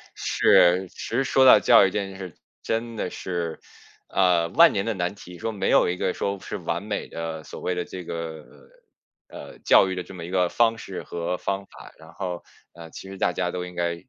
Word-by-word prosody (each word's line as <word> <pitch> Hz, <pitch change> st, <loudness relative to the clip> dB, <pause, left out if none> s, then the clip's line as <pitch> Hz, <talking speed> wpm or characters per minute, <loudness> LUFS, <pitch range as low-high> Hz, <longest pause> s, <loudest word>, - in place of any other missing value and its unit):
是， 90 Hz, +2 st, +4 dB
其 -, -, -22 dB
实 125 Hz, +4 st, -1 dB
说 135 Hz, 0 st, +3 dB
到 -, -, +9 dB
教 115 Hz, -5 st, +6 dB
育 -, -, +2 dB
这 105 Hz, -, -1 dB
件 95 Hz, -1 st, -6 dB
事 95 Hz, -4 st, -8 dB, 0.3 s
真 115 Hz, +1 st, -2 dB
的 90 Hz, -, -3 dB
是， 85 Hz, -4 st, -4 dB, 0.5 s
呃， 90 Hz, -3 st, +2 dB
万 170 Hz, 0 st, +6 dB
年 100 Hz, -, -1 dB
的 115 Hz, -, -1 dB
难 95 Hz, +1 st, -2 dB
题， 90 Hz, -2 st, -12 dB
说 115 Hz, +6 st, -3 dB
没 105 Hz, -, -2 dB
有 -, -, +4 dB
一 90 Hz, -, -2 dB
个 90 Hz, -, -1 dB
说 100 Hz, 0 st, -3 dB
是 -, -, -6 dB
完 85 Hz, +3 st, -3 dB
美 105 Hz, -1 st, -4 dB
的 80 Hz, -1 st, -6 dB
所 -, -, -10 dB
谓 90 Hz, -, -1 dB
的 90 Hz, -1 st, -3 dB
这 90 Hz, -1 st, -8 dB
个， 80 Hz, -2 st, -6 dB, 0.8 s
呃， -, -, -11 dB
教 95 Hz, -, +5 dB
育 95 Hz, -, -3 dB
的 90 Hz, -, -4 dB
这 95 Hz, -, -12 dB
么 85 Hz, -3 st, -8 dB
一 -, -, -8 dB
个 90 Hz, -1 st, +1 dB
方 115 Hz, -1 st, +2 dB
式 95 Hz, -, -7 dB
和 85 Hz, +1 st, -3 dB
方 100 Hz, 0 st, -3 dB
法。 -, -, -14 dB
然 80 Hz, 0 st, -16 dB
后， 90 Hz, -3 st, -5 dB, 0.3 s
呃， 85 Hz, -1 st, -11 dB
其 95 Hz, -, -10 dB
实 95 Hz, -, -9 dB
大 90 Hz, -1 st, +1 dB
家 90 Hz, -1 st, -1 dB
都 90 Hz, 0 st, -4 dB
应 90 Hz, -, -11 dB
该 85 Hz, -1 st, -1 dB
90 Hz, 245 characters per minute, -24 LUFS, 85-100 Hz, 0.8 s, 到